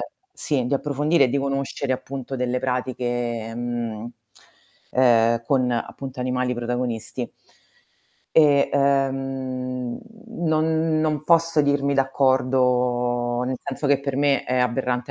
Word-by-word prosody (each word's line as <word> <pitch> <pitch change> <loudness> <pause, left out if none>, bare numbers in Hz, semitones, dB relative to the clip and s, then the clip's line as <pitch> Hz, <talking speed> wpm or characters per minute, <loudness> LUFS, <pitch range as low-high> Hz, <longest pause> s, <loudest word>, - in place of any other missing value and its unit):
ehm - - -3 0.3
sì, 135 - -1
di 135 - 0
approfondire 145 +2 +2
e 130 - +2
di 140 - 0
conoscere 135 -1 -2
appunto 135 +1 -5
delle 125 0 -1
pratiche, 120 -3 -2
mhmm, 120 -2 -4 0.8
ehm, 115 -2 +4
con 130 0 +1
appunto 130 +2 -4
animali 125 0 0
protagonisti. 120 -1 -3 1.0
E, 145 -3 +5
ehm, 135 -2 -1 0.3
non 160 -4 +1
non 155 -2 -1
posso 165 -2 +3
dirmi 140 0 +1
d'accordo, 125 -2 +1
nel 130 +1 -2
senso 140 +1 -3
che 140 -1 +4
per 140 -1 -4
me 140 -2 +2
è 130 - -1
aberrante 125 0 -1
130 Hz, 120 wpm, -23 LUFS, 125-140 Hz, 1.0 s, E